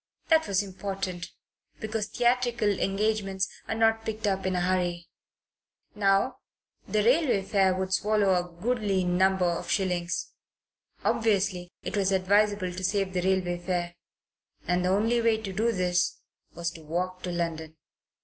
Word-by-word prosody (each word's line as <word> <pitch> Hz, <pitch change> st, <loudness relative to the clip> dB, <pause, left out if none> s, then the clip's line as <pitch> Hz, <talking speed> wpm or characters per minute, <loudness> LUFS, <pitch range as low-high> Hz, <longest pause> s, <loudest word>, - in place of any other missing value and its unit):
That 320 Hz, -1 st, +4 dB
was 200 Hz, 0 st, +1 dB
important, 190 Hz, -2 st, -5 dB, 0.5 s
because 220 Hz, -1 st, -2 dB
theatrical 240 Hz, -2 st, +1 dB
engagements 195 Hz, -1 st, 0 dB, 0.2 s
are -, -, -2 dB
not 225 Hz, 0 st, +2 dB
picked 220 Hz, 0 st, -4 dB
up 195 Hz, -2 st, 0 dB
in 185 Hz, -, 0 dB
a 180 Hz, -, +1 dB
hurry. 175 Hz, -1 st, -1 dB, 0.8 s
Now; 205 Hz, +5 st, +2 dB, 0.5 s
the 215 Hz, -1 st, +1 dB
railway 250 Hz, -4 st, +3 dB
fare 190 Hz, -1 st, +2 dB
would 190 Hz, 0 st, -2 dB
swallow 205 Hz, 0 st, +2 dB
a 175 Hz, -1 st, -1 dB
goodly 210 Hz, -6 st, +1 dB
number 185 Hz, +1 st, +2 dB
of 170 Hz, -1 st, -1 dB
shillings. 180 Hz, -3 st, -1 dB, 0.7 s
Obviously 195 Hz, -5 st, +1 dB
it -, -, -4 dB
was 195 Hz, -1 st, +1 dB
advisable 195 Hz, 0 st, +2 dB
to 185 Hz, +1 st, -6 dB
save 195 Hz, 0 st, 0 dB
the 180 Hz, -, 0 dB
railway 180 Hz, -1 st, 0 dB
fare; 175 Hz, -1 st, -2 dB, 0.7 s
and 180 Hz, +1 st, +1 dB
the 180 Hz, -, +1 dB
only 225 Hz, +5 st, +2 dB
way 230 Hz, -1 st, +3 dB
to 200 Hz, -3 st, -6 dB
do 225 Hz, +4 st, +1 dB
this 180 Hz, -3 st, 0 dB, 0.4 s
was 170 Hz, 0 st, -2 dB
to 165 Hz, -, -12 dB
walk 180 Hz, +4 st, -3 dB
to 180 Hz, -, -4 dB
London. 160 Hz, -2 st, -3 dB
190 Hz, 150 wpm, -27 LUFS, 180-215 Hz, 0.8 s, That